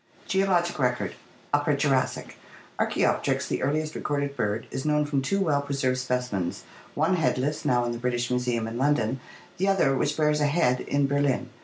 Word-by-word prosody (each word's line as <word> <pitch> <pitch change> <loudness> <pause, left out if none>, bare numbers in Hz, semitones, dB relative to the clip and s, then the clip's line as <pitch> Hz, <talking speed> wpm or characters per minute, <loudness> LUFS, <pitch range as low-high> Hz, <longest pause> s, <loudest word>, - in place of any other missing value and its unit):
Geologic 180 -4 +1
Record 125 -2 0 0.4
Upper - - +2
Jurassic. - - 0 0.2
— - - -24
Archaopteryx, - - +1
the - - -2
earliest 155 +3 0
recorded 140 -1 -2
bird, 105 -2 -1
is 135 - -3
known 150 0 +2
from 145 -2 0
two 195 +9 0
well 155 -7 +2
preserved 135 -2 -1
specimens, 125 -8 -2 0.3
one 165 +5 +2
headless, 150 -2 0
now 120 -1 +2
in 120 - -1
the 120 - -4
British 120 0 -1
Museum 125 -2 0
in 115 +2 -5
London, 135 -3 +1 0.4
the 190 - 0
other, 180 -9 +3
which 145 +2 0
bears 150 -1 +2
a 145 - +3
head, 145 -5 +2
in 140 0 +1
Ber 140 +1 +1
lin. 130 -3 0
140 Hz, 180 wpm, -26 LUFS, 125-150 Hz, 0.4 s, other